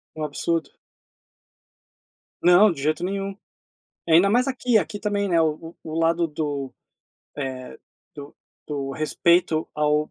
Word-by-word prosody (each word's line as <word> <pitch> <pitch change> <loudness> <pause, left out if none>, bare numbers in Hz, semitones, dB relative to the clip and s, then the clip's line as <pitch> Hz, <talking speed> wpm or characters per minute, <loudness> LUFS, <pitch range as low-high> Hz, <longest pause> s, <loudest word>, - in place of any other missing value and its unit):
É - - -10
um - - 0
absurdo. 165 +3 -1 1.7
Não, 180 +4 +6
de 140 - -7
jeito 155 +3 0
nenhum. 195 +1 -3 0.7
E 165 - +2
ainda 180 +5 +6
mais 245 +5 +2
aqui. 250 -3 +2
Aqui 205 0 -2
também, 205 -1 -1
né, 170 -2 +3
o 160 +1 -2
o 160 +1 -4
lado 165 +1 +2
do, 145 -3 -4 0.6
eh, 130 -3 -6 0.4
do 145 0 -10 0.3
do 140 -2 -4
respeito 160 +2 +1
ao 150 0 +1
165 Hz, 135 wpm, -23 LUFS, 150-190 Hz, 1.7 s, Não